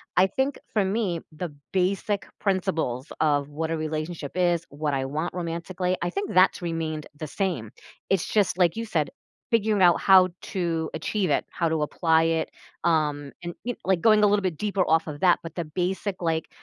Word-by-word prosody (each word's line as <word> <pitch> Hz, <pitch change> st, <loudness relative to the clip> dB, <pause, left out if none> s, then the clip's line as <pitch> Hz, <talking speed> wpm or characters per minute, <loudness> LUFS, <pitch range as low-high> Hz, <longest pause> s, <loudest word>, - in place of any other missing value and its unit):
I 185 Hz, +1 st, +5 dB
think 265 Hz, +7 st, -1 dB
for 205 Hz, -3 st, +2 dB
me, 190 Hz, -4 st, 0 dB
the 155 Hz, -1 st, -5 dB, 0.2 s
basic 195 Hz, +2 st, 0 dB
principles 165 Hz, -, -1 dB
of 145 Hz, -2 st, +2 dB
what 160 Hz, +2 st, -3 dB
a -, -, +1 dB
relationship 155 Hz, -1 st, -4 dB
is, 175 Hz, -2 st, +2 dB
what 145 Hz, 0 st, -2 dB
I 135 Hz, -1 st, 0 dB
want 155 Hz, +5 st, -3 dB
romantically, 180 Hz, +1 st, -2 dB
I 175 Hz, -, 0 dB
think 200 Hz, +3 st, -3 dB
that's 185 Hz, +2 st, +4 dB
remained 160 Hz, -3 st, -3 dB
the 155 Hz, -, -4 dB
same. 150 Hz, -, -2 dB, 0.4 s
It's 195 Hz, -3 st, +1 dB
just, 200 Hz, -4 st, +2 dB
like 175 Hz, +1 st, +3 dB
you 230 Hz, -, -2 dB
said, 165 Hz, -8 st, 0 dB, 0.4 s
figuring 215 Hz, -3 st, +2 dB
out 175 Hz, -2 st, +5 dB
how 190 Hz, -1 st, +7 dB
to 165 Hz, -4 st, -2 dB
achieve 185 Hz, +4 st, -1 dB
it, -, -, +1 dB
how 170 Hz, -2 st, 0 dB
to 160 Hz, -1 st, 0 dB
apply 160 Hz, +1 st, +2 dB
it, 165 Hz, 0 st, 0 dB, 0.3 s
um, 150 Hz, -4 st, +1 dB
and 175 Hz, 0 st, -4 dB
y 245 Hz, -1 st, -2 dB
like, 190 Hz, -3 st, +2 dB
going 215 Hz, -2 st, +5 dB
a 210 Hz, -, +7 dB
little 205 Hz, 0 st, +3 dB
bit 185 Hz, -5 st, -2 dB
deeper 200 Hz, 0 st, 0 dB
off 160 Hz, 0 st, +4 dB
of 145 Hz, -2 st, -6 dB
that, 180 Hz, 0 st, +4 dB
but 165 Hz, -, -7 dB
the 170 Hz, -, -2 dB
basic, 185 Hz, +4 st, -2 dB
like, 160 Hz, -2 st, -1 dB
175 Hz, 190 wpm, -26 LUFS, 160-190 Hz, 0.4 s, how